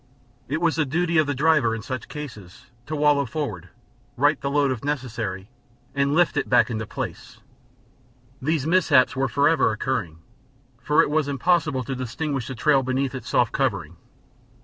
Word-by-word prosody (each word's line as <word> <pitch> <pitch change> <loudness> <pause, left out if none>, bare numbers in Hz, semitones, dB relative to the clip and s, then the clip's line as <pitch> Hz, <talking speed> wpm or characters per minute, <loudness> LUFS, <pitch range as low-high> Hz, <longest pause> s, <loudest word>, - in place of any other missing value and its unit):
It 155 +4 -1
was 165 -2 +1
the 160 - +3
duty 170 +3 +1
of 155 - +2
the 145 - -1
driver, 140 -5 +3
in 110 - -7
such 130 0 -5
case, 150 -6 -7 0.5
to 155 - -3
wallow 145 -2 +3
forward, 105 - -5 0.5
right 145 +3 +2
the 140 - -2
load 140 -1 +2
if 125 -4 -4
necessary, 115 -9 -3 0.5
and 140 +1 +1
lift 175 -2 +3
it 140 - -1
back - - +4
into 110 -1 -3
place. - - -6 1.0
These 150 +1 0
mishaps 160 -6 +3
were 135 0 +1
forever 145 0 +3
occurring, 110 -7 -3 0.6
for 150 +3 +4
it - - -2
was 155 -1 +1
impossible 145 -1 +1
to 135 - -4
distinguish 130 +2 -3
the 130 - -5
trail 135 +4 +3
beneath 130 +1 -1
its 130 -4 -7
soft - - +2
covering. - - -1
140 Hz, 170 wpm, -24 LUFS, 125-150 Hz, 1.0 s, back